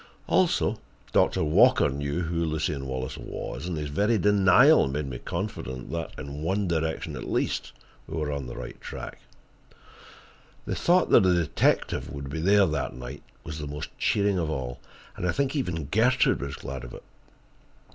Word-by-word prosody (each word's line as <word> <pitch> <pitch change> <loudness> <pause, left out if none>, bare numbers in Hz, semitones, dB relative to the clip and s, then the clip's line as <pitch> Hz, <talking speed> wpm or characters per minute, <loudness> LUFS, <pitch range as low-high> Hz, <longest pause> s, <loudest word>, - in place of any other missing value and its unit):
Also, - - +2 0.3
Doctor - - +3
Walker 75 0 +5
knew 70 +4 -2
who 85 0 -1
Lucien 75 -3 -2
Wallace 65 -1 -4
was, 85 - -6
and 90 -3 -3
his 75 -1 -3
very 105 +10 +2
denial 105 - +5
made 70 +2 -2
me 65 -3 -6
confident 75 - -5
that, 85 0 -3
in 65 - -6
that 70 - -8
one 95 +4 0
direction 80 -1 -2
at - - -6
least, - - -1 0.4
we - - -5
were 75 -2 -1
on 70 -3 -4
the - - -7
right 60 -1 -8
track. - - -7 1.5
The - - -2
thought 175 +1 +3
that - - +8
the 90 -2 +4
detective 85 -4 +1
would 70 0 -6
be 80 - -3
there 100 +3 +5
that 75 -7 -2
night 60 -1 -8 0.2
was 75 0 -6
the 75 - -5
most 75 +1 -6
cheering 100 -1 +2
thing - - +1
of 80 -2 -1
all, 65 -5 -4 0.4
and 90 - -2
I - - +4
think 140 +1 -1
even 90 - -2
Gertrude 110 - +3
was 70 0 -4
glad 65 -1 -7
of - - -8
it. - - -11
80 Hz, 180 wpm, -27 LUFS, 70-95 Hz, 1.5 s, that